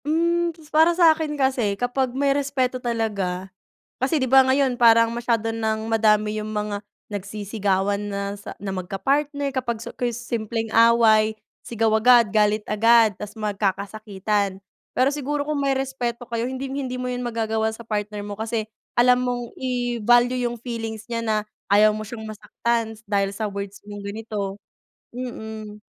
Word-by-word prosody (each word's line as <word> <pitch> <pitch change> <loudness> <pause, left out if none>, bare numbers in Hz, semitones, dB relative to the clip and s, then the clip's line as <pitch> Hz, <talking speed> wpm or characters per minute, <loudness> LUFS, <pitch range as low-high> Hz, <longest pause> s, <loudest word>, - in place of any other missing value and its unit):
Hmm, 340 +3 +2
ta's 305 -2 -18
para 325 +2 +5
sa'kin 315 -3 +4
kasi 255 -7 +1
kapag 250 +2 0
may 280 0 +3
respeto 265 -3 -1
talaga 200 -6 -2 0.5
kasi, 275 +4 +2
di 260 - 0
ba, 265 +1 +7
ngayon 260 0 +2
parang 230 -1 +5
masyado 230 -1 0
ng 220 -1 -1
madami 215 -1 +2
yung 215 - -6
mga 210 -1 -3 0.2
nagsisigawan 205 -1 -1
na 200 0 -3
sa 205 0 -9
na 195 -1 -4
magkapartner 275 - -1
kapag 245 -3 -1
su 225 - -8
kris 240 -2 -2
simpleng 230 -1 -3
away, 225 -2 +5 0.2
sigaw 225 -1 -1
agad, 235 +1 +6
galit 210 0 +2
agad, 225 0 +4
ta's 210 +3 -9
magkakasakitan. 200 -1 -1 0.3
Pero 255 +2 +2
siguro 290 0 -2
kung 300 -2 -1
may 275 - +1
respeto 245 -3 -3
kayo 235 +2 -2
hinding-hindi 265 -1 -4
mo 250 - -3
yun 250 0 -3
magagawa 220 -2 -1
sa 220 +1 -10
partner 210 -1 -3
mo 205 - -5
kasi, 220 +1 -3 0.3
alam 250 +1 +5
mong 245 -1 -3
i-value 245 0 +2
yung 240 - -7
feelings 225 -2 -5
niya 230 -1 -3
na, 220 -1 +1 0.3
ayaw 210 +1 +6
mo 215 - -4
siyang 220 0 -8
masaktan 225 +1 -2
dahil 200 -1 +1
sa 215 +2 -3
words 200 0 -6
mong 205 -1 -8
ganito. 200 -1 -5 0.6
Mm. 220 -4 -7
225 Hz, 155 wpm, -23 LUFS, 210-250 Hz, 0.6 s, ba